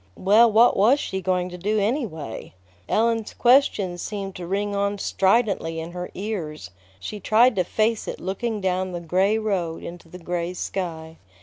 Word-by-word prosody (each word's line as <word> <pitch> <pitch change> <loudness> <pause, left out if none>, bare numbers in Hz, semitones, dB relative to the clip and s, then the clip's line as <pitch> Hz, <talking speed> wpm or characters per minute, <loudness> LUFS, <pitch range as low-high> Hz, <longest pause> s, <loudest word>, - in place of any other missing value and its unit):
Well, 220 +5 +5
what 230 +3 +5
was 235 +9 +4
she 190 -7 -3
going 180 0 0
to 180 0 -9
do, 210 +4 0
anyway? 200 - -3 0.3
Ellen's 225 0 0
question 230 -8 +3
seemed 195 0 -5
to 175 -1 -7
ring 200 +2 -1
on 200 0 0
stridently 195 -5 +1
in 165 +1 -6
her 180 0 -6
ears; 175 - -5 0.3
she 210 - -6
tried 230 +4 +4
to 185 - +3
face 220 +4 0
it - - -5
looking 210 +3 -3
down 185 0 -1
the 175 - -3
gray 185 +5 +1
road 185 -7 -2
into 170 -1 -9
the 180 - -10
gray 175 0 -3
sky. 165 -4 -5
190 Hz, 170 wpm, -23 LUFS, 175-215 Hz, 0.3 s, Well